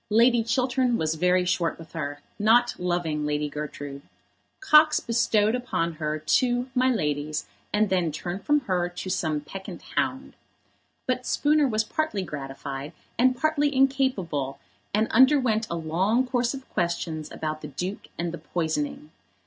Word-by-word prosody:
Lord 230 Hz, +1 st, +4 dB
Chiltern 250 Hz, 0 st, +1 dB
was 155 Hz, 0 st, 0 dB
very 180 Hz, +3 st, +2 dB
short 170 Hz, -2 st, 0 dB
with 165 Hz, -1 st, -12 dB
her, 145 Hz, -2 st, -4 dB, 0.2 s
not 235 Hz, +3 st, +4 dB
loving 175 Hz, -4 st, -1 dB
Lady 150 Hz, 0 st, 0 dB
Gertrude. 145 Hz, -1 st, -6 dB, 0.6 s
Cox 305 Hz, -5 st, +6 dB
bestowed 225 Hz, -2 st, +2 dB
upon 205 Hz, -9 st, -1 dB
her 155 Hz, 0 st, -1 dB
two 245 Hz, -, +1 dB
"my 255 Hz, 0 st, +3 dB
lady's," 150 Hz, -, -1 dB, 0.3 s
and 210 Hz, +1 st, +3 dB
then 180 Hz, -4 st, +2 dB
turned 175 Hz, +5 st, -5 dB
from 295 Hz, 0 st, +3 dB
her 180 Hz, -7 st, 0 dB
to 175 Hz, +1 st, -6 dB
some 155 Hz, -4 st, 0 dB
peccant 190 Hz, +4 st, -8 dB
hound. 265 Hz, +1 st, -1 dB, 0.7 s
But 255 Hz, 0 st, -1 dB
Spooner 295 Hz, 0 st, +3 dB
was 220 Hz, -3 st, +1 dB
partly 220 Hz, -5 st, -2 dB
gratified, 140 Hz, -1 st, -6 dB, 0.3 s
and 255 Hz, +1 st, +4 dB
partly 295 Hz, -2 st, +1 dB
incapable, 255 Hz, -, +1 dB, 0.3 s
and 215 Hz, +2 st, +2 dB
underwent 255 Hz, -4 st, +4 dB
a 170 Hz, -, -2 dB
long 185 Hz, +10 st, +1 dB
course 245 Hz, 0 st, 0 dB
of 265 Hz, -1 st, -10 dB
questions 170 Hz, -3 st, -2 dB
about 155 Hz, 0 st, -4 dB
the 150 Hz, -, -6 dB
Duke 180 Hz, +8 st, -5 dB
and 170 Hz, 0 st, -2 dB
the 170 Hz, -, -7 dB
poisoning. 155 Hz, -2 st, -3 dB
185 Hz, 150 wpm, -26 LUFS, 155-250 Hz, 0.7 s, Cox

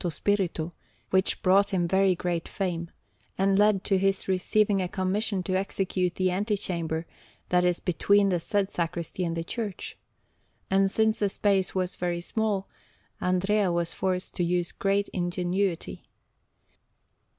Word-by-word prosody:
Spirito, 175 Hz, -2 st, -1 dB, 0.4 s
which 190 Hz, 0 st, +2 dB
brought 195 Hz, +2 st, +4 dB
him 175 Hz, -3 st, 0 dB
very 190 Hz, +1 st, +3 dB
great 175 Hz, -1 st, -2 dB
fame, 170 Hz, -4 st, -3 dB, 0.5 s
and 195 Hz, +1 st, +3 dB
led 210 Hz, -2 st, +4 dB
to 195 Hz, -2 st, +2 dB
his 195 Hz, 0 st, +1 dB
receiving 195 Hz, +2 st, +2 dB
a 180 Hz, -, -1 dB
commission 195 Hz, +1 st, -1 dB
to 185 Hz, -, -2 dB
execute 185 Hz, -2 st, -1 dB
the 185 Hz, -1 st, +1 dB
antechamber 180 Hz, -5 st, -2 dB, 0.4 s
that 180 Hz, 0 st, +3 dB
is 180 Hz, -1 st, +2 dB
between 200 Hz, +3 st, +3 dB
the 180 Hz, -2 st, +1 dB
said 200 Hz, +3 st, 0 dB
sacristy 170 Hz, +1 st, -3 dB
and 165 Hz, -1 st, -2 dB
the 165 Hz, -, -2 dB
church; 210 Hz, +1 st, -5 dB, 0.8 s
and 195 Hz, 0 st, +4 dB
since 220 Hz, +2 st, +1 dB
the 205 Hz, -, +2 dB
space 195 Hz, -2 st, +1 dB
was 185 Hz, -1 st, -1 dB
very 175 Hz, -1 st, -1 dB
small, 205 Hz, +1 st, -1 dB, 0.5 s
Andrea 190 Hz, +2 st, +2 dB
was 170 Hz, -1 st, -1 dB
forced 185 Hz, -1 st, -2 dB
to 175 Hz, -, +1 dB
use 175 Hz, 0 st, 0 dB
great 200 Hz, +1 st, 0 dB
ingenuity. 180 Hz, 0 st, -2 dB
185 Hz, 140 wpm, -27 LUFS, 175-200 Hz, 0.8 s, brought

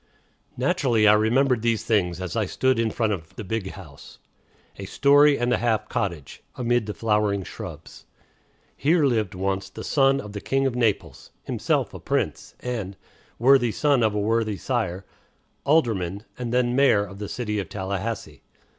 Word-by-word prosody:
Naturally, 115 Hz, -5 st, +2 dB
I 105 Hz, -, +8 dB
remembered 120 Hz, +3 st, +2 dB
these 115 Hz, -1 st, 0 dB
things 90 Hz, -6 st, 0 dB
as 95 Hz, +2 st, -5 dB
I 110 Hz, -3 st, 0 dB
stood 130 Hz, +2 st, +1 dB
in 115 Hz, -1 st, +1 dB
front 110 Hz, -1 st, 0 dB
of 80 Hz, -4 st, -8 dB
"the 110 Hz, -, -6 dB
big 100 Hz, -1 st, -4 dB
house" 80 Hz, -9 st, -13 dB, 0.6 s
a 100 Hz, -, -6 dB
story 145 Hz, +6 st, +4 dB
and 120 Hz, 0 st, +1 dB
a -, -, +2 dB
half 110 Hz, -3 st, 0 dB
cottage 85 Hz, -8 st, -4 dB
amid 120 Hz, -3 st, 0 dB
the 105 Hz, -, -4 dB
flowering 105 Hz, -3 st, +1 dB
shrubs. -, -, -10 dB, 0.7 s
Here 155 Hz, +1 st, +2 dB
lived 110 Hz, -7 st, 0 dB
once 95 Hz, +1 st, -2 dB
the -, -, -9 dB
son 135 Hz, -1 st, +3 dB
of 105 Hz, -5 st, -8 dB
the 100 Hz, -, -5 dB
King 135 Hz, 0 st, 0 dB
of 135 Hz, -, 0 dB
Naples; 115 Hz, -5 st, -1 dB
himself -, -, -1 dB
a -, -, -8 dB
Prince, -, -, -2 dB
and 110 Hz, -6 st, -4 dB, 0.4 s
worthy 125 Hz, -1 st, +4 dB
son 140 Hz, +1 st, +2 dB
of 110 Hz, -2 st, +2 dB
a -, -, 0 dB
worthy 110 Hz, 0 st, 0 dB
sire 95 Hz, -8 st, -2 dB, 0.6 s
alderman 110 Hz, -, +1 dB
and 120 Hz, -2 st, -5 dB
then 125 Hz, 0 st, +1 dB
mayor 130 Hz, -7 st, +4 dB
of 100 Hz, 0 st, -11 dB
the 105 Hz, -, -5 dB
city 105 Hz, -4 st, -3 dB
of 95 Hz, -5 st, -5 dB
Tallahassee. 95 Hz, -4 st, -4 dB
110 Hz, 170 wpm, -24 LUFS, 100-125 Hz, 0.7 s, I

